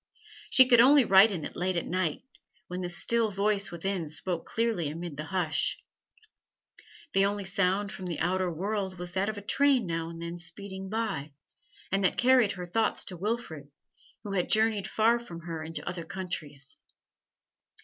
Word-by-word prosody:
She 260 -1 +7
could 240 -2 +7
only 275 +1 +7
write 195 +2 +7
in 175 -7 -4
it - - -8
late 185 +1 -1
at 170 - -1
night, 180 -4 -1 0.4
when 180 +1 -5
the 180 - -3
still 225 +5 +1
voice 200 0 0
within 175 0 -3
spoke 165 +3 -3
clearly 225 -9 0
amid 165 0 -6
the 150 +2 -5
hush. 160 -3 0 1.4
The 195 - +4
only 200 0 -2
sound 195 +1 0
from 185 - -7
the 170 - -3
outer 180 +1 0
world 190 +2 -3
was 175 0 -6
that 190 +3 0
of 215 - -4
a 205 - -7
train 275 +1 +3
now 165 -1 -3
and 165 0 -9
then 170 +1 -6
speeding 190 +1 -7
by, 200 -10 -3 0.6
and 195 +1 +1
that 180 - +2
carried 250 -4 +4
her 180 -2 -6
thoughts 220 +6 0
to 185 - -6
Wilfrid, 180 -7 -4 0.5
who 205 - -6
had 185 -3 0
journeyed 215 -2 +2
far 230 +2 +3
from 175 -8 -9
her 165 -1 -5
into 160 +1 -5
other 175 -1 -4
countries. 155 -6 -6
190 Hz, 175 wpm, -29 LUFS, 170-210 Hz, 1.4 s, She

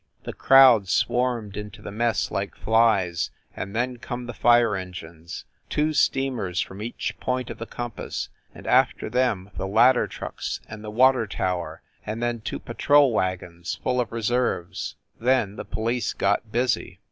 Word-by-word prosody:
The - - -6
crowd 130 -7 +6
swarmed 120 -4 0
into 105 -1 -8
the - - -6
mess 115 +1 0
like 100 0 -3
flies 110 -6 +2 0.3
and 100 +2 -6
then 125 +1 -1
come 120 0 -6
the 120 - -6
fire 120 -2 +4
en 95 -1 -5
gines 80 0 -9 0.2
two 155 +1 +1
steamers 130 - 0
from 95 +2 -4
each 115 +2 -4
point 125 -1 -2
of - - -9
the 115 - -6
com 120 -1 -5
pass, - - -5 0.3
and - - -12
after - - +2
them 110 -6 0
the 95 - -2
ladder 120 +5 +4
trucks - - -5
and 105 0 -9
the 105 - -6
water 125 +1 +4
tower 90 -4 -3 0.2
and 110 +2 -4
then 120 -1 -2
two - - -4
patrol 140 +2 +3
wagons 90 -3 -2
full 125 -1 +1
of 115 - -4
reserves. 115 -5 -1 0.2
Then 120 -4 +2
the - - -7
police 115 +2 -1
got 100 +2 0
busy. 125 +1 -1
115 Hz, 165 wpm, -25 LUFS, 100-125 Hz, 0.3 s, crowd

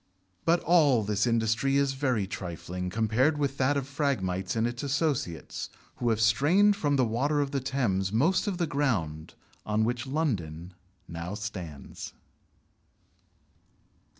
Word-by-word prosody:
But 170 +1 +3
all 145 -9 +4
this 105 +2 0
industry 115 +4 +2
is 140 -1 +2
very 130 -7 0
trifling 90 -1 -5
compared 115 - +2
with 140 -2 -1
that 140 +2 +3
of 135 -2 -2
Phragmites 100 -11 -1
and 115 0 +1
its 120 +1 -3
associates, 140 - -2 0.3
who 120 - 0
have 110 -1 +1
strained 150 - +4
from 145 -7 +1
the 130 -2 +3
water 135 +7 0
of 140 -1 0
the 140 - 0
Thames 115 -8 0
most 160 - +2
of 195 -3 -1
the 175 - +1
ground 105 - -1 0.3
on 105 +1 +1
which 120 +3 -1
London 95 - -2 0.3
now 85 +4 -5
stands. 95 -9 -7
120 Hz, 140 wpm, -28 LUFS, 100-145 Hz, 0.3 s, all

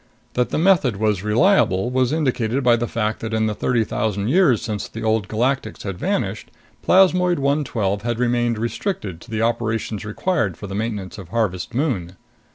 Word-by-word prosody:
That 125 0 0
the - - -1
method 165 - +3
was 105 -2 +1
reliable 105 - +3
was 130 -1 +1
indicated 130 -4 0
by 120 -1 +5
the 120 0 -2
fact 110 -1 -2
that, 110 0 -3
in 110 0 +1
the 110 - 0
thirty 115 +2 +1
thousand 105 -1 -2
years 150 - +4
since 110 -3 -4
the 115 - -7
Old 110 -3 +1
Galactics 115 +1 -1
had 100 -3 -5
vanished, - - -2 0.3
plasmoid 180 -1 +4
112 135 -8 0
had 120 +1 -2
remained 120 -1 +1
restricted 110 - -3
to - - -14
the 110 0 -1
operations 115 -2 -1
required 105 - -1
for - - -8
the 95 - -7
maintenance 105 -2 -4
of 90 -4 -10
Harvest 105 -2 -2
Moon. 100 - -1
115 Hz, 175 wpm, -21 LUFS, 105-130 Hz, 0.3 s, by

